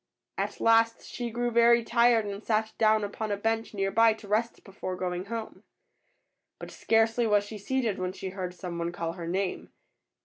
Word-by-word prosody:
At - - -3
last 230 0 +3
she 240 -1 -4
grew 240 +1 -2
very 235 0 +5
tired 235 -1 +3
and 200 +1 -6
sat 220 0 0
down 215 -1 +4
upon 210 +1 -4
a 205 - 0
bench 225 +2 -1
near 195 0 0
by 225 +1 +5
to 220 -1 -13
rest 220 +3 -1
before 190 -1 -6
going 180 0 -3
home. 225 +1 -6 1.0
But - - -9
scarcely 225 +1 +2
was 205 -1 +3
she 210 +1 -8
seated 230 -1 -1
when 185 0 -2
she 190 0 -6
heard 185 -1 -5
some 175 -1 -6
one 170 0 -2
call 165 -1 -4
her 170 -2 -7
name. 185 +2 -2
215 Hz, 190 wpm, -28 LUFS, 190-230 Hz, 1.0 s, very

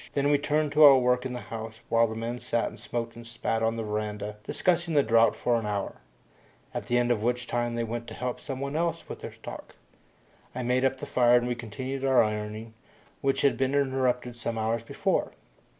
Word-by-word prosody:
Then 140 0 +2
we 145 - +4
turned 150 +1 0
to 150 +2 +5
our 140 -2 +10
work 125 0 +2
in 125 - -6
the 125 - -5
house 110 0 -6
while 115 0 +4
the 110 - -6
men 115 +2 -4
sat 115 - -1
and - - -13
smoked 115 -1 -4
and 120 0 -10
spat 115 -1 -2
on 115 0 +1
the 115 - -3
veranda, 105 -1 -3
discussing 175 -2 +1
the 145 - +5
drought 115 0 +4
for 120 -1 +1
an 110 -2 -3
hour, 100 -1 -3 0.8
at - - -4
the 120 - +2
end 120 0 +2
of 110 -3 +1
which 125 +1 0
time 120 -1 -1
they 120 - -1
went 115 +1 -4
to 110 - -8
help 125 -1 -3
someone 140 +2 -4
else 165 0 -1
with - - -8
their - - -6
stock. - - -10 0.8
I 125 - -3
made 125 +2 +1
up 135 0 +2
the - - -6
fire 120 -1 +4
and 120 0 0
we 125 - 0
continued 130 +4 -5
our 135 -2 +5
ironing, 105 +1 -4 0.5
which 135 0 +1
had 140 - +3
been 135 +1 +1
interrupted 130 -3 0
some 115 -1 -4
hours 110 +1 0
before. 115 - -1
120 Hz, 220 wpm, -28 LUFS, 115-135 Hz, 0.8 s, our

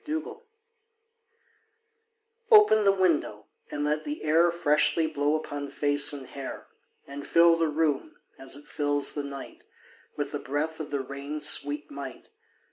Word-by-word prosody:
Nelson] 315 +8 -5 2.1
OPEN 420 - +6
the 195 - +6
window, 170 - 0 0.2
and 145 - -4
let 150 +1 -1
the 295 +1 -6
air 165 +3 +3
Freshly 160 -1 +2
blow 150 -1 0
upon 145 -2 -5
face 145 0 +2
and 140 -2 -6
hair, 135 +1 -8 0.4
And 140 0 -9
fill 170 0 +5
the 165 -1 0
room, 150 -2 -1 0.2
as 135 0 -2
it 145 +1 -13
fills 145 -1 +2
the 145 - -3
night, 140 -1 -9 0.5
With - - -3
the - - -4
breath 150 +4 -3
of 155 - -6
the 140 -1 -2
rain's 140 +3 -3
sweet 145 +1 +1
might. 140 -3 -9
145 Hz, 145 wpm, -27 LUFS, 140-165 Hz, 2.1 s, OPEN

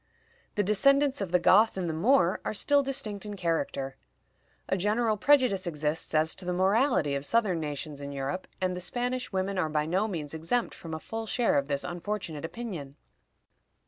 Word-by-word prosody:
The 205 - +2
descendants 275 +6 +3
of 190 -4 -3
the 180 - +5
Goth 200 +5 +5
and 180 -2 -1
the 160 - -1
Moor 180 +1 +3
are - - -3
still 285 +6 +3
distinct 220 -7 -3
in 210 -1 -6
character. 145 -6 -2 0.7
A - - +1
general 215 +4 +1
prejudice 245 -6 +3
exists 155 0 -2
as 155 +1 +3
to - - -6
the 180 0 -2
morality 190 - +2
of 140 0 -2
Southern 200 0 +1
nations 150 -1 -5
in 140 0 -6
Europe, 140 +6 -4
and 185 -1 0
the 180 - -5
Spanish 245 +6 -2
women 190 0 -1
are 160 - 0
by 150 0 0
no 185 +7 +1
means 160 -8 -4
exempt 165 +10 -1
from 160 -2 -7
a - - -5
full 225 +6 -5
share 240 +1 +2
of 140 -1 +1
this 140 -1 -1
unfortunate 175 -3 -4
opinion. 165 -10 -6
185 Hz, 185 wpm, -28 LUFS, 160-220 Hz, 0.7 s, the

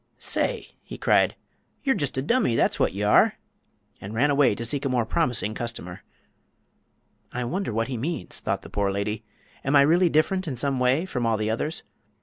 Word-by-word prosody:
"Say!" - - -1
he - - -9
cried, - - +3 0.5
"ye'r 270 - +3
just 145 - -1
a 130 - 0
dummy, 195 - +2
that's - - +2
wot - - +2
ye 100 +2 -3
are!" 105 - +4 0.6
and 100 +3 -7
ran 145 +6 +3
away 140 -6 +4
to 115 - -5
seek 140 +4 -1
a 140 - 0
more 125 -3 +1
promising 120 -7 0
customer. 100 -6 -6 1.3
"I 125 - -3
wonder 180 +6 -2
that 115 +1 0
he 130 -2 -4
means," 155 +7 -3
thought - - -2
the - - -10
poor 100 -1 0
lady. 100 +2 -2 0.4
"Am 135 +2 +1
I 140 - +8
really 170 +4 +4
different 180 +4 +1
in 140 - -2
some 135 +2 -1
way 130 +7 +2
from 125 -11 -2
all 115 -1 +2
the 110 0 -1
others? 150 +8 -2
125 Hz, 195 wpm, -25 LUFS, 110-150 Hz, 1.3 s, I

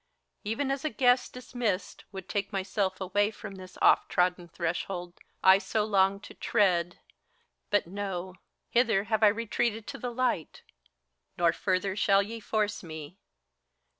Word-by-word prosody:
Even 230 +6 -1
as 275 0 -2
a 310 - 0
guest 250 -3 +3
dismissed^ 235 -7 -3
would 190 -2 -8
take 200 +2 -2
myself 190 -1 -1
away 200 +2 +1
From 215 -2 -9
this 185 -1 -11
oft - - +5
trodden 180 0 +1
threshold 175 +1 -4 0.2
I 190 +1 +8
so 210 +2 -1
longed 200 -1 +2
to - - -10
tread. 180 -5 +1 0.7
But, 205 - +2
no! 190 0 -4 0.4
hither 230 -5 +3
have 220 0 0
I 215 - +8
retreated 225 +1 0
to - - -7
the 245 - -3
light; 240 -9 -1 0.7
Nor 170 -1 +3
further 190 0 0
shall 200 -1 +4
ye 225 +3 -7
force 210 -1 -1
me. 160 +1 -9
200 Hz, 145 wpm, -29 LUFS, 185-220 Hz, 0.7 s, I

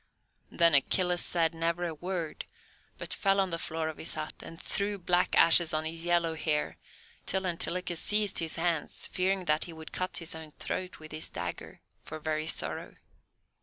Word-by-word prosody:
Then 170 -2 +4
Achilles 180 +5 +4
said 165 -2 +2
never 165 +1 -1
a 170 -2 -2
word, 175 0 -4 0.5
but - - -4
fell 195 0 +2
on 190 -2 +1
the 165 - -2
floor 160 -1 -2
of 160 - -5
his - - -4
hut, 155 0 -4
and 165 - -9
threw 205 0 -1
black 180 -1 +1
ashes 165 -1 +7
on 155 0 0
his 165 +1 -4
yellow 170 -1 +2
hair, 155 -1 -1 0.5
till 190 0 0
Antilochus 175 0 0
seized 210 -1 +3
his 165 -1 0
hands, 165 -2 -1
fearing 190 0 0
that 150 -1 +2
he 170 - -8
would 160 0 -10
cut 185 0 -2
his 165 -1 -2
own 160 -2 -9
throat 185 0 -4
with 155 0 -12
his 155 +1 -5
dagger, 85 0 -6 0.2
for 155 - -7
very 155 0 -2
sorrow. - - -2
165 Hz, 180 wpm, -30 LUFS, 160-180 Hz, 0.5 s, ashes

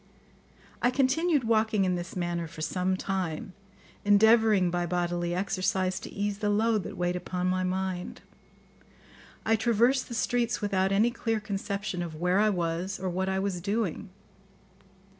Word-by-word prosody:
I 245 - +4
continued 280 +3 +2
walking 220 -3 +2
in 185 - +1
this 175 +1 -5
manner 175 -2 -2
for 160 0 -10
some 185 +3 0
time, 185 -2 -3 0.5
endeavouring 210 -2 +5
by 175 0 -1
bodily 175 0 -1
exercise 185 0 0
to - - -9
ease 205 0 -2
the 210 - 0
load 215 +1 +2
that - - -7
weighed 175 0 0
upon 180 0 -3
my 185 0 +1
mind. 185 -1 -3 1.2
I 225 - +4
traversed 235 +4 +2
the 235 - -5
streets 240 +1 0
without 195 -2 +1
any 215 +5 +3
clear 225 -2 -1
conception 200 -2 -3
of 165 -2 -5
where 180 +4 +1
I 215 +1 +4
was 175 0 -2
or 185 -1 -2
what 190 +2 -1
I 190 - 0
was 190 -2 -2
doing. 205 -1 -2
190 Hz, 155 wpm, -28 LUFS, 180-215 Hz, 1.2 s, endeavouring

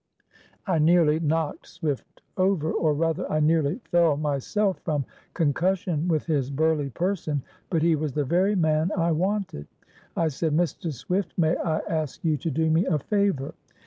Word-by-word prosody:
I 180 -5 +1
nearly 160 -1 +4
knocked 160 -1 -1
Swift 155 -6 -5
over, 185 -4 +1
or 155 -2 +1
rather 165 +3 -1
I 155 - +2
nearly 155 - +2
fell 170 -4 +4
myself, 155 - 0
from 150 -5 -2 0.3
concussion 170 +2 0
with 160 -4 +1
his 145 -5 0
burly 150 0 +1
person, 160 -3 -2 0.3
but 165 -4 +1
he 165 -1 +4
was 150 -2 -3
the 145 0 0
very 185 +8 +2
man 160 -1 +2
I 170 -1 +2
wanted. 185 - -1 0.5
I 165 -1 +2
said, 155 +2 -1
'Mr. 165 0 0
Swift, 180 - -3
may 165 -1 +3
I 160 -2 -1
ask 155 -1 -3
you 155 -2 +3
to 165 - -3
do 160 +2 +1
me 165 +4 +2
a 160 - +2
favor? 195 -3 0
160 Hz, 165 wpm, -25 LUFS, 150-175 Hz, 0.5 s, nearly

